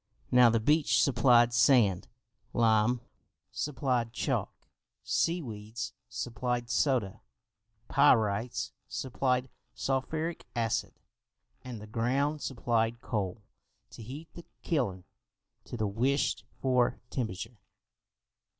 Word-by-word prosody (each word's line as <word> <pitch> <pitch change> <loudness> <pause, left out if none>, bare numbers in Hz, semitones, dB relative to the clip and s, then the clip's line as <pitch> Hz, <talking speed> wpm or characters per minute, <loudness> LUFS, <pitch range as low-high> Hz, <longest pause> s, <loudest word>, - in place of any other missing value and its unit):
Now 125 -1 +7
the 115 0 +2
beach 150 +7 +3
supplied 120 -3 +4
sand, 110 -9 +4 0.5
lime 115 +1 +3 0.5
supplied 125 -5 -1
chalk, - - -3 0.4
sea 170 0 0
weeds 110 -2 -6 0.2
supplied 120 +1 -3
soda, 125 -11 +1 0.7
pyrites 110 +1 +2 0.2
supplied 130 0 -1 0.3
sulphuric 155 +5 -2
acid 115 -2 -1 0.7
and 125 -3 -7
the 105 - -9
ground 135 +7 0
supplied 115 -2 0
coal 105 -2 -3 0.5
to - - -11
heat 140 +8 -9
the 170 - -11 0.2
kiln 110 - -1 0.6
to - - -7
the 110 - 0
wished 125 +8 0
for 125 -2 +2
temperature. 115 -1 -4
120 Hz, 95 wpm, -30 LUFS, 110-135 Hz, 0.7 s, Now